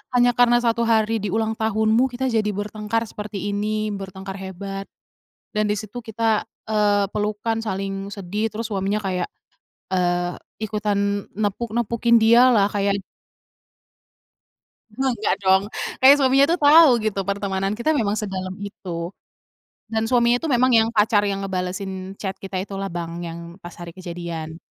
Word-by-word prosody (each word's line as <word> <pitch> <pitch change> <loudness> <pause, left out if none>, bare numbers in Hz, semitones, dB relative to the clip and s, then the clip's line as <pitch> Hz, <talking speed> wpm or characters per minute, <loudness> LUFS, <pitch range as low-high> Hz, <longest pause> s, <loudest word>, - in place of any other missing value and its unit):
hanya 245 0 +5
karena 240 0 +4
1 230 0 +1
hari 225 0 +2
di 205 - -3
ulang 220 +2 0
tahunmu, 220 +3 +2
kita 250 +1 -2
jadi 215 -2 +1
bertengkar 210 +2 -2
seperti 205 -2 -5
ini, 215 +1 -1
bertengkar 195 0 -7
hebat 195 +1 -6 0.7
dan 210 0 +1
di 210 - 0
situ 215 +4 -6
kita 225 -1 0 0.2
eee, 205 -2 +2
pelukan, 210 +2 -1
saling 195 -2 -4
sedih 205 +3 -3
terus 225 +2 -5
suaminya 195 +2 0
kayak 180 -2 -1 0.6
eee, 175 -1 +1 0.3
ikutan 205 -1 -1
nepuk-nepukin 235 +2 +1
dia 235 +3 +6
lah, 210 -5 +4
kayak 200 -1 +1 2.0
Enggak 245 -3 0
dong, 190 0 +4 0.4
kayak 270 +2 +9
suaminya 270 +1 +5
tuh - - -3
tahu 300 +1 +8
gitu, 210 -2 -1
pertemanan 195 0 -1
kita 235 +8 -1
memang 210 -4 +1
sedalam 185 -2 -4
itu, 175 -4 -5 0.8
dan 220 0 +1
suaminya 240 -1 +4
itu 325 - -2
memang 255 +1 +4
yang 225 0 +5
pacar 210 -1 +3
yang 195 -1 -2
ngebalesin 190 +1 -4
chat 190 -2 -3
kita 190 -1 -4
itulah, 195 -1 -5
Bang, 170 0 -5
yang 170 0 -6 0.2
pas 175 -1 -9
hari 170 -1 -8
kejadian. 170 -3 -6
205 Hz, 145 wpm, -22 LUFS, 195-225 Hz, 2.0 s, kayak